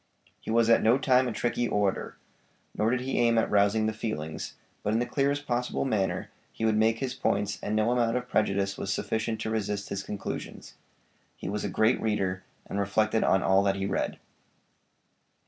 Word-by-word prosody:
He - - -10
was 115 0 +3
at 115 - +5
no 115 +4 +4
time 130 -1 +3
a - - -1
tricky 120 +1 -1
orator, 100 -3 -1 0.6
nor 105 +2 +1
did 125 +1 0
he 130 0 -1
aim 115 -1 +3
at 115 - +1
rousing 105 +2 +3
the 110 - 0
feelings, 80 -9 -5 0.3
but 105 - -1
in - - +3
the 120 - +1
clearest 140 +3 0
possible 125 +1 -1
manner 105 -7 -1 0.2
he 110 - -3
would 110 -1 +3
make 110 +1 +3
his 130 +1 -3
points 105 -5 -1
and 105 - -2
no 110 +2 +2
amount 120 -1 +2
of 125 0 -4
prejudice 100 -4 0
was 100 - -2
sufficient 110 +2 -2
to 110 - -2
resist 105 -2 -2
his 100 -1 -3
conclusions. 100 0 -6 0.6
He - - -7
was 105 +1 -2
a - - -1
great 110 +3 +2
reader, 95 -4 -1 0.2
and 100 - -4
reflected 110 +2 +1
on 95 - +3
all 95 +1 +4
that 100 -1 +1
he 95 0 -2
read. 95 -1 -1
110 Hz, 195 wpm, -28 LUFS, 100-120 Hz, 0.6 s, at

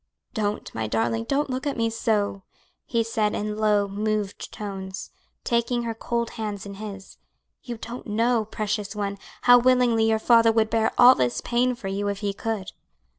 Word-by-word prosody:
"Don't, 210 -3 -2
my 110 -1 -2
darling, 115 +1 0
don't 285 0 0
look 260 +3 -3
at 280 - -2
me 230 0 +1
so," 210 -3 0 0.5
he 230 -2 +1
said 220 -2 0
in 210 0 -2
low, 210 -1 +2
moved 210 0 -2
tones, 195 -2 -6 0.3
taking 240 0 0
her 230 -1 -2
cold 235 +1 -2
hands 205 -2 -4
in 200 - -7
his. 195 -1 -9 0.4
"You 240 -3 -6
don't 235 +3 -8
know, 225 +1 +1
precious 210 -1 -3
one, 200 -1 -3 0.2
how 245 0 +8
willingly 240 -3 +3
your 220 - +3
father 230 0 +5
would 220 -1 +1
bear 225 -1 +2
all 245 +1 +9
this 125 - 0
pain 245 +1 +1
for 210 - -7
you 200 +1 -2
if 200 0 -3
he 200 -1 -1
could." 210 -2 -4
220 Hz, 175 wpm, -25 LUFS, 200-235 Hz, 0.5 s, all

